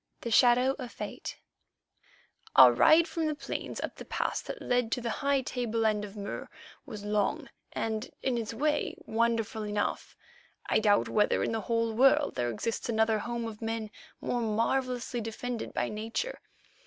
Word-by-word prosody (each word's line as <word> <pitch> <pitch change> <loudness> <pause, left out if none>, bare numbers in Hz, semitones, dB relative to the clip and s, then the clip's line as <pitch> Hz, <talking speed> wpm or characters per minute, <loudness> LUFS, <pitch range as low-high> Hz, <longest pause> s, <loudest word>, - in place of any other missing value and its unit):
THE 235 - -4
SHADOW 250 +3 +5
OF 250 -3 -6
FATE - - -6 1.2
Our - - +9
ride 330 +2 +6
from 320 -1 -1
the 305 - -1
plains - - -5
up - - -5
the - - -7
pass - - -1
that - - -7
led 245 -2 0
to - - 0
the 230 -1 -2
high 280 -1 +2
tableland 225 -4 0
of 210 0 -8
Mur 205 +6 -5 0.4
was 205 -1 -7
long 210 -1 0 0.2
and, 220 +1 -2
in 260 -2 +1
its 230 -2 -2
way, 295 +6 0
wonderful 225 -1 0
enough. 210 0 -2 0.5
I - - +3
doubt 205 -2 +3
whether 210 -1 +2
in - - 0
the 225 -1 -1
whole 230 +1 0
world 270 +5 +4
there 120 -1 -1
exists 225 - -3
another 220 -1 +2
home 235 +1 -3
of 220 -1 -7
men 225 -1 -3 0.3
more 245 - -1
marvellously 240 +2 0
defended 225 +2 -4
by - - -1
nature. 225 - -3
230 Hz, 165 wpm, -30 LUFS, 215-250 Hz, 1.2 s, Our